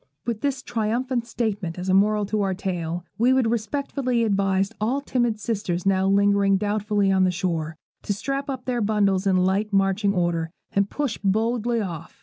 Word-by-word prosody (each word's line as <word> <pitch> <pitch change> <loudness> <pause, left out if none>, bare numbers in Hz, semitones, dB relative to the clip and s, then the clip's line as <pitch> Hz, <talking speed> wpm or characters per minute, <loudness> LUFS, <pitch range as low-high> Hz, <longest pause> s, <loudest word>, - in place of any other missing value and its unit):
With 230 -3 -2
this 275 -2 -1
triumphant 240 +2 -1
statement 205 -8 -2
as 180 +1 -5
a 185 - +2
moral 210 +2 +3
to 210 +1 -1
our 195 -1 0
tale, 175 -3 -3
we 245 +3 +4
would 255 -4 +2
respectfully 250 +1 -1
advise 195 -1 +1
all 245 +6 +1
timid 240 -5 0
sisters 195 -6 -2
now 190 0 +2
lingering 200 0 +3
doubtfully 205 0 0
on 190 -1 +3
the 185 - +4
shore, 165 -3 -2 0.2
to - - -4
strap 275 +7 -3
up 260 -2 -4
their 245 -2 -1
bundles 200 -2 +1
in 190 -1 +3
light 190 +3 +1
marching 195 +1 +2
order, 170 -2 0 0.2
and 200 0 +2
push 285 -6 -2
boldly 225 +3 +1
off. 170 -5 -7
205 Hz, 175 wpm, -24 LUFS, 190-235 Hz, 0.2 s, we